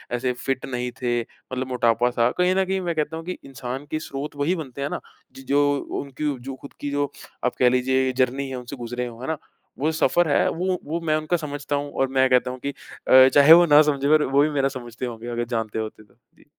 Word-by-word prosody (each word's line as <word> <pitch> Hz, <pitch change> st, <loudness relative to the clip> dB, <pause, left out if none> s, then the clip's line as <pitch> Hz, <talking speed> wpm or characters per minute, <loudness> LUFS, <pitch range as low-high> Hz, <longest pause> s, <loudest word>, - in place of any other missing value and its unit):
ऐसे 125 Hz, +1 st, -1 dB
फ़िट 130 Hz, +2 st, -3 dB
नहीं 125 Hz, -2 st, -3 dB
थे। 120 Hz, -1 st, +1 dB
मतलब 130 Hz, +2 st, -7 dB
मोटापा-सा 120 Hz, -1 st, +2 dB
कहीं 180 Hz, +1 st, +3 dB
न 190 Hz, -, +2 dB
कहीं 190 Hz, +1 st, -1 dB
मैं 170 Hz, -2 st, -2 dB
कहता 155 Hz, +1 st, -2 dB
हूँ 165 Hz, -, -8 dB
कि 180 Hz, -, -4 dB
इंसान 130 Hz, +1 st, -6 dB
की 155 Hz, -, -1 dB
स्रोत 145 Hz, -1 st, -6 dB
वही 145 Hz, +6 st, 0 dB
बनते 140 Hz, -4 st, -7 dB
हैं 140 Hz, -, -1 dB
ना -, -, -3 dB, 0.4 s
ज 135 Hz, -, -10 dB
जो 140 Hz, -, +4 dB, 0.4 s
उनकी 140 Hz, +1 st, -8 dB, 0.2 s
जो 135 Hz, -, -5 dB
खुद 140 Hz, -, -11 dB
की 145 Hz, -, -3 dB
जो 145 Hz, 0 st, -1 dB, 0.3 s
आप 125 Hz, -, 0 dB
कह 125 Hz, -, +6 dB
लीजिए 130 Hz, +1 st, +1 dB
जर्नी 130 Hz, +2 st, +1 dB
है, 130 Hz, -, -5 dB
उनसे 125 Hz, +2 st, -7 dB
गुज़रे 125 Hz, 0 st, -4 dB
हों, 120 Hz, 0 st, -10 dB
है 130 Hz, -, -5 dB
ना? 160 Hz, -, -1 dB, 0.4 s
वो 155 Hz, +3 st, +1 dB
सफ़र 170 Hz, +2 st, +2 dB
है, -, -, +3 dB
वो, 180 Hz, +1 st, -1 dB
वो 160 Hz, +3 st, -2 dB
मैं 155 Hz, -, +2 dB
उनका 155 Hz, +3 st, 0 dB
समझता 145 Hz, -2 st, -4 dB
हूँ 145 Hz, 0 st, -3 dB
और 135 Hz, -, 0 dB
मैं 130 Hz, 0 st, +5 dB
कहता 125 Hz, 0 st, +3 dB
हूँ 130 Hz, -, -8 dB
कि -, -, 0 dB, 0.4 s
अ, 130 Hz, 0 st, +8 dB
चाहे 145 Hz, +2 st, +9 dB
वो 175 Hz, +1 st, +8 dB
ना 150 Hz, -1 st, +7 dB
समझें, 140 Hz, -2 st, +1 dB
पर 155 Hz, 0 st, +5 dB
वो 140 Hz, +1 st, +3 dB
भी 150 Hz, -, +3 dB
मेरा 140 Hz, -2 st, +1 dB
समझते 125 Hz, -2 st, -7 dB
होंगे 115 Hz, -1 st, -7 dB
अगर 120 Hz, 0 st, -2 dB
जानते 110 Hz, -1 st, -2 dB
होते 110 Hz, 0 st, -6 dB
तो। 105 Hz, -, -27 dB, 0.2 s
जी। -, -, -23 dB
135 Hz, 240 wpm, -23 LUFS, 125-150 Hz, 0.4 s, चाहे